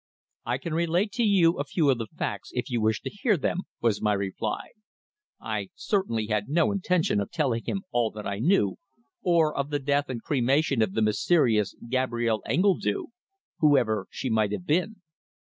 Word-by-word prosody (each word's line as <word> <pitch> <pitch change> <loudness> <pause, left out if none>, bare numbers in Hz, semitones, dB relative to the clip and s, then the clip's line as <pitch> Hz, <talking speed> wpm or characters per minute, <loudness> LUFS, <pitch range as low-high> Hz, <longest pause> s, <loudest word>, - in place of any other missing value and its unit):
"I 120 +1 0
can 155 +5 -5
relate 170 +5 +1
to 235 +3 0
you 185 -7 +4
a - - +1
few 145 -1 +2
of 125 - 0
the 115 - -4
facts - - -5
if - - -3
you 120 -2 0
wish 110 0 +1
to - - -4
hear 205 -1 +1
them," 160 +4 -1 0.2
was 115 -3 +1
my 105 -1 +2
reply. 100 +2 -3 0.7
I - - -4
certainly 190 - -1
had 105 +1 -1
no 170 +5 +2
intention 180 - +1
of 100 - -3
telling 130 -8 -1
him 195 - -3
all 120 -2 +1
that 105 -1 -7
I 100 0 -3
knew, 120 - +2 0.4
or 165 -4 +2
of 140 +1 -2
the 145 - 0
death 140 0 0
and 125 -3 -3
cremation 135 +1 +1
of 105 -3 +1
the 110 - +1
mysterious 110 - +2
Gabrielle 120 -3 0
Engledue 160 - +1 0.5
whoever 115 -10 +3
she - - -5
might 110 -2 +2
have 175 - -4
been. 185 +5 0
135 Hz, 180 wpm, -27 LUFS, 110-170 Hz, 0.7 s, you